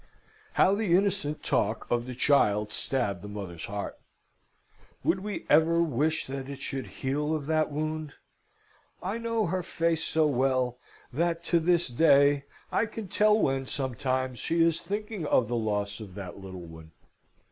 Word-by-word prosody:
How 190 - +4
the 200 -4 +2
innocent 190 -6 0
talk 110 +2 0
of 120 0 +1
the 125 - -5
child 105 -6 +3
stabbed 100 -7 -1
the 105 - -8
mother's 95 -5 -6
heart! 100 0 -5 1.0
Would 190 - +2
we 205 +1 -5
ever 160 +2 +4
wish 155 -1 +1
that 135 0 -6
it 140 -1 -7
should 135 -1 -4
heal 150 +4 -1
of 150 -3 -4
that 155 0 +1
wound? 155 0 -3 0.9
I 200 +5 -2
know 230 -2 0
her 185 +2 -1
face 165 -2 0
so 160 -1 +2
well 130 -3 +1 0.3
that, 170 +3 0
to 170 0 +2
this 170 +1 +2
day, 140 +1 +4 0.3
I 230 - +2
can 215 -3 -7
tell 210 +2 +4
when, 135 -6 0
sometimes, 130 -1 -2
she 165 0 +2
is 165 -1 +2
thinking 205 -4 -4
of 120 - +3
the 120 - -2
loss 105 -2 -1
of 100 -4 -9
that 100 -2 -7
little 95 -2 -8
one. 80 -1 -12
145 Hz, 160 wpm, -28 LUFS, 120-170 Hz, 1.0 s, How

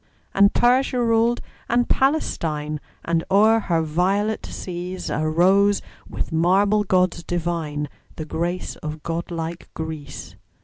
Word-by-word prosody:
And 200 +1 +5
Persia 250 +1 +3
ruled 230 0 +2 0.3
and 240 +1 +2
Palestine; 155 - 0 0.3
And 165 -1 +1
o'er 215 +3 +5
her 170 -6 0
violet 190 +7 0
seas 180 0 -5
Arose, 185 +6 +3 0.3
with - - -4
marble 195 +6 +3
gods 180 -3 +1
divine, 165 -4 -2 0.3
The 155 - -5
grace 175 +3 -3
of 155 0 -6
god 170 0 -3
like 165 0 -5
Greece. 155 -3 -7
175 Hz, 120 wpm, -23 LUFS, 160-205 Hz, 0.3 s, And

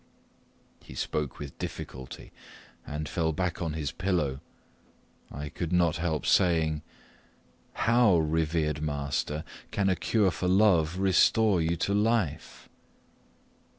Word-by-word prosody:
He 65 - -12
spoke 75 +1 -3
with 70 -2 -9
difficulty, 65 0 -7 0.6
and 75 +1 -4
fell 80 -1 0
back 90 +3 -2
on 80 -3 -2
his 75 -3 -3
pillow. 85 -8 -1 0.9
I 70 +2 -6
could 85 +2 -4
not 85 -2 +2
help 80 -3 -2
saying, 80 -4 +2 0.9
"How, 115 -5 +4
revered 80 -1 0
master, 75 +1 -2 0.3
can 100 -1 0
a 95 - +2
cure 100 +2 +1
for 80 +4 -3
love 90 -4 +3
restore 95 +1 +3
you 80 +1 0
to 100 +4 0
life?" 105 -7 -1
80 Hz, 120 wpm, -28 LUFS, 75-95 Hz, 0.9 s, How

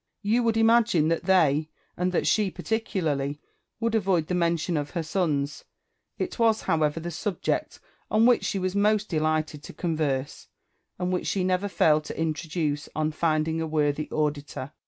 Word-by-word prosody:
You 220 +4 +2
would 230 -1 +1
imagine 225 -8 +4
that 165 - -1
they, 155 -5 +3 0.3
and 180 +1 0
that 180 - 0
she 210 -3 +2
particularly, 155 -11 -2 0.4
would 230 0 0
avoid 195 -7 +2
the 180 - -3
mention 170 -1 +1
of 145 -1 -2
her 170 - -3
sons: 150 -4 -1 0.5
it - - -4
was 225 -1 +3
however 155 0 +1
the 170 +1 -5
subject 190 +3 -2 0.3
on 220 +1 +4
which 245 -1 +4
she - - -1
most 200 +3 +1
delighted 155 -2 0
to - - -10
con 170 -3 -2
verse, 140 -3 -2 0.5
and 180 0 -1
which 180 - -1
she 190 - 0
never 185 +2 +1
failed 155 -5 +3
to - - -7
introduce 155 -2 -2
on 155 0 0
finding 160 0 0
a 160 - -2
worthy 150 -1 0
auditor. 145 -2 -2
165 Hz, 165 wpm, -26 LUFS, 155-195 Hz, 0.5 s, imagine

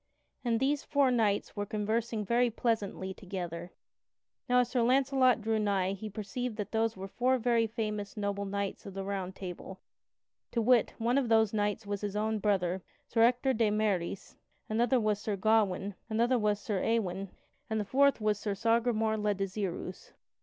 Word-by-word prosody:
And 230 -2 +1
these 280 +2 +1
four 280 -3 +2
knights 215 -4 +1
were 205 -1 -3
conversing 215 +1 -1
very 240 +3 +3
pleasantly 210 -5 -2
together. 175 -3 -6 0.8
Now 250 0 +5
as 245 - -2
Sir 250 -1 +1
Launcelot 255 0 +3
drew 220 0 0
nigh 195 -3 +1
he 215 +2 -6
perceived 215 +3 -4
that 210 - -4
those 225 -1 0
were 190 +1 -6
four 255 +6 +1
very 235 -1 +2
famous 215 -2 -4
noble 200 -1 -2
knights 200 0 -3
of 195 - -9
the 195 - -3
Round 190 -1 -4
Table; 190 0 -7 0.7
to 235 - +1
wit: 235 0 +3
one 240 +4 +2
of 250 -4 -2
those 220 -2 +4
knights 210 0 -1
was 205 -1 -3
his 205 -1 -3
own 215 +1 0
brother, 190 -3 +1 0.3
Sir 225 - +1
Ector 250 +3 +4
de 220 -2 +2
Maris, 205 -4 -1 0.3
another 240 +3 +2
was 215 -2 +1
Sir 210 -1 -2
Gawain, 205 -1 +2 0.2
another 235 +3 +2
was 210 -1 +1
Sir 205 -2 -2
Ewain, 195 -4 0 0.4
and 220 0 0
the 210 - -2
fourth 280 +5 +3
was 210 -1 +1
Sir 205 -2 -2
Sagramore 225 0 +1
le 210 -1 0
Desirous. 195 -2 -4
215 Hz, 175 wpm, -31 LUFS, 200-235 Hz, 0.8 s, Now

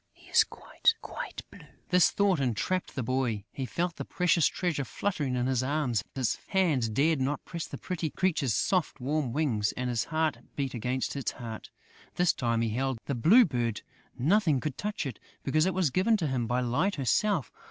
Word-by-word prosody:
He - - -21
is - - +7
quite, 455 - 0
quite - - -6
blue!" - - -13 0.3
This 180 -2 +5
thought 200 -5 +2
enraptured 135 - -1
the 130 - -1
boy. 120 -4 -1
He 130 -2 -4
felt 170 +10 -2
the - - -3
precious 175 -3 +2
treasure 170 -6 -1
fluttering 145 - -2
in 125 0 0
his 130 -1 +1
arms; 130 -6 0
his 130 -5 0
hands 160 - +2
dared 140 +6 +2
not 140 +3 -1
press 170 -2 -5
the - - -7
pretty 170 -4 -3
creature's 155 - 0
soft, 180 - 0
warm 140 0 -1
wings; 115 -7 0
and 125 0 -2
his 115 -1 0
heart 160 -2 0 0.2
beat 135 -2 -2
against 125 +4 -2
its 140 - -2
heart. 115 -3 -8 0.5
This 175 -1 +3
time, 115 -2 0
he 115 - +1
held 130 +3 -1
the 140 - -2
Blue 185 - +6
Bird! 120 - -2 0.3
Nothing 155 - +3
could 150 -1 -3
touch 210 -5 -3
it, 130 -6 -5 0.2
because 155 +5 +2
it 190 - 0
was 180 -7 +2
given 205 - +3
to 175 - -2
him 125 -4 -1
by 125 +2 +1
Light 145 +12 +1
herself. 150 - +1
140 Hz, 195 wpm, -29 LUFS, 125-175 Hz, 0.5 s, is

